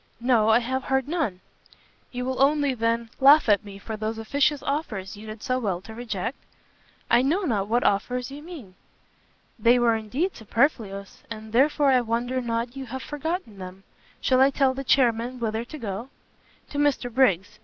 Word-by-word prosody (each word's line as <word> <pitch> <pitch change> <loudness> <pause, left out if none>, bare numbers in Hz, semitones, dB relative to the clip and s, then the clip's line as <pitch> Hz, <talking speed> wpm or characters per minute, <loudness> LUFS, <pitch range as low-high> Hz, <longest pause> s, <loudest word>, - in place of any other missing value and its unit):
"No, 235 -3 +3
I 220 - +6
have 260 +2 -2
heard 265 0 0
none!" 290 - -2 0.7
"You 250 0 -4
will 260 0 -2
only, 285 0 +3
then, 230 -1 -1
laugh 285 +2 +7
at 205 -1 +4
me 200 -1 -10
for 220 +2 -6
those 215 +1 -3
officious 285 +6 0
offers 215 -11 -3
you 210 +2 -11
did 215 0 -8
so 255 0 0
well 195 -7 -1
to 220 +3 -11
reject?" 230 0 -4 0.7
"I - - +6
know 320 +10 +1
not 210 - 0
what 240 +3 +1
offers 250 +6 0
you 285 +2 -8
mean!" 300 - -10 0.9
"They 235 +3 +5
were 240 -1 +3
indeed 250 - -2
superfluous, 220 -4 -1
and 220 -1 -8
therefore 280 +2 +4
I 255 -1 +4
wonder 240 +2 -1
not 235 +1 -3
you 270 -1 -6
have 260 +2 -6
forgotten 295 - -4
them. 185 +1 -9 0.4
Shall 260 -1 +3
I 270 - +6
tell 270 -1 +2
the 270 +1 -5
chairmen 245 -1 +2
whither 225 -1 -2
to 305 - -9
go?" 225 0 -5 0.6
"To 285 - -3
Mr 280 -4 +1
Briggs. 205 -7 +2
240 Hz, 180 wpm, -25 LUFS, 220-270 Hz, 0.9 s, laugh